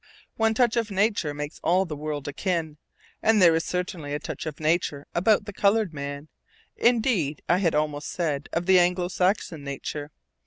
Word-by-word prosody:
One 225 Hz, 0 st, +2 dB
touch 240 Hz, -1 st, +2 dB
of 230 Hz, -1 st, 0 dB
nature 200 Hz, -5 st, +1 dB
makes 145 Hz, +1 st, -6 dB
all 185 Hz, +3 st, +3 dB
the 160 Hz, -4 st, -5 dB
world 150 Hz, -1 st, -4 dB
akin, 160 Hz, 0 st, -2 dB, 0.4 s
and 220 Hz, -1 st, +4 dB
there 170 Hz, -3 st, +7 dB
is 165 Hz, 0 st, +1 dB
certainly 175 Hz, -5 st, -3 dB
a -, -, -2 dB
touch 160 Hz, -, -6 dB
of 150 Hz, -, -6 dB
nature 155 Hz, -2 st, 0 dB
about 205 Hz, +4 st, +3 dB
the 205 Hz, -, -7 dB
colored 200 Hz, -2 st, +2 dB
man; 140 Hz, +1 st, -6 dB, 0.5 s
indeed, 220 Hz, -, +1 dB
I 175 Hz, -, +4 dB
had 170 Hz, -5 st, +1 dB
almost 150 Hz, -1 st, -1 dB
said, 150 Hz, -5 st, -2 dB
of 170 Hz, +2 st, -2 dB
Anglo 180 Hz, -1 st, +4 dB
Saxon 180 Hz, -5 st, 0 dB
nature. 145 Hz, +1 st, -5 dB
170 Hz, 170 wpm, -25 LUFS, 150-200 Hz, 0.5 s, there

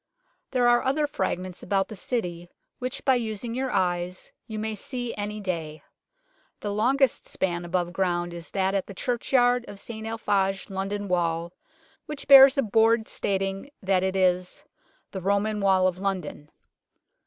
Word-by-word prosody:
There 250 Hz, -2 st, +2 dB
are 240 Hz, 0 st, +5 dB
other 285 Hz, +3 st, +1 dB
fragments 185 Hz, -10 st, -3 dB
about 195 Hz, -1 st, 0 dB
the 215 Hz, -, -8 dB
City 175 Hz, -6 st, -3 dB, 0.3 s
which 255 Hz, 0 st, -5 dB
by 265 Hz, -, +5 dB
using 230 Hz, -1 st, -2 dB
your 260 Hz, +2 st, -2 dB
eyes 180 Hz, -3 st, -1 dB, 0.2 s
you 220 Hz, -2 st, -5 dB
may 220 Hz, +1 st, -2 dB
see 245 Hz, +3 st, -4 dB
any 210 Hz, +1 st, -4 dB
day. 165 Hz, -6 st, -4 dB, 0.8 s
The 205 Hz, -1 st, -2 dB
longest 255 Hz, +5 st, +2 dB
span 175 Hz, -2 st, -1 dB
above 175 Hz, 0 st, -2 dB
ground 175 Hz, -2 st, -1 dB
is 170 Hz, -1 st, -8 dB
that 190 Hz, -1 st, 0 dB
at 195 Hz, -1 st, -1 dB
the 200 Hz, -, -9 dB
churchyard 245 Hz, +1 st, +2 dB
of 200 Hz, -, -9 dB
St 220 Hz, 0 st, -7 dB
Alphage 195 Hz, -3 st, -1 dB
London 200 Hz, +1 st, -3 dB
Wall, 170 Hz, -1 st, -1 dB, 0.5 s
which 295 Hz, -2 st, -7 dB
bears 275 Hz, 0 st, +9 dB
a 275 Hz, -, +3 dB
board 225 Hz, +1 st, +3 dB
stating 195 Hz, +4 st, -2 dB
that 190 Hz, -1 st, +2 dB
it 190 Hz, 0 st, -1 dB
is 180 Hz, -1 st, +1 dB, 0.2 s
" -, -, -38 dB
The 190 Hz, -, -5 dB
Roman 200 Hz, +3 st, 0 dB
Wall 190 Hz, -1 st, +4 dB
of 185 Hz, 0 st, -2 dB
London." 185 Hz, -6 st, -4 dB
200 Hz, 160 wpm, -26 LUFS, 185-230 Hz, 0.8 s, bears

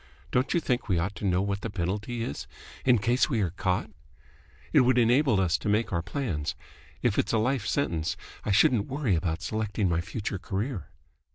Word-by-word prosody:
Don't 125 Hz, +2 st, +1 dB
you -, -, +4 dB
think 125 Hz, -6 st, -1 dB
we 90 Hz, -, +3 dB
ought 90 Hz, +5 st, -1 dB
to -, -, -4 dB
know 90 Hz, +1 st, +2 dB
what 100 Hz, 0 st, -2 dB
the 115 Hz, -, -3 dB
penalty 105 Hz, +5 st, -2 dB
is, 70 Hz, -, -5 dB, 0.4 s
in 125 Hz, -2 st, +6 dB
case 120 Hz, +5 st, +2 dB
we 120 Hz, -6 st, +1 dB
are 90 Hz, -4 st, 0 dB
caught?" 90 Hz, 0 st, -1 dB, 0.8 s
"It -, -, +7 dB
would 125 Hz, 0 st, +4 dB
enable 120 Hz, -1 st, +4 dB
us 90 Hz, -2 st, +2 dB
to -, -, -2 dB
make 105 Hz, 0 st, +1 dB
our 85 Hz, -, +1 dB
plans. 90 Hz, -, -3 dB, 0.5 s
If -, -, +2 dB
it's 110 Hz, -, 0 dB
a -, -, +4 dB
life 115 Hz, -1 st, 0 dB
sentence, 85 Hz, -, 0 dB, 0.3 s
I -, -, -3 dB
shouldn't 105 Hz, +2 st, +4 dB
worry 135 Hz, -6 st, 0 dB
about 80 Hz, +1 st, -1 dB
selecting 110 Hz, -2 st, -1 dB
my 85 Hz, 0 st, +1 dB
future 105 Hz, +1 st, -4 dB
career." 100 Hz, +3 st, -3 dB
105 Hz, 195 wpm, -28 LUFS, 90-120 Hz, 0.8 s, It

